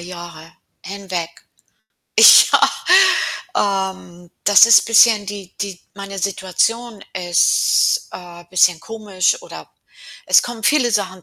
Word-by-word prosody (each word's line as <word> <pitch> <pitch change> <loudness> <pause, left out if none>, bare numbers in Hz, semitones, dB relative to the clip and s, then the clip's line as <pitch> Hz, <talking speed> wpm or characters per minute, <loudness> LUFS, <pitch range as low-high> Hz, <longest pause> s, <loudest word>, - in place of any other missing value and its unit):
Jahre 170 -2 -12 0.3
hinweg. 190 -4 -7 0.9
Ja. - - +6 1.2
Ähm, 175 -2 -18
das 205 +2 +5
ist 230 - +4
bisschen, 225 -2 +3
die 195 -2 -10
die 195 -3 -6
meine 200 -1 -9
Situation 200 +4 -3
ist, 180 - 0
äh, 175 -1 -13
bisschen 180 -2 +1
komisch 215 - -3
oder - - -13 0.6
es - - +4
kommen 240 -2 -9
viele 275 -5 +1
Sachen 185 -3 -4
195 Hz, 105 wpm, -17 LUFS, 180-220 Hz, 1.2 s, Ja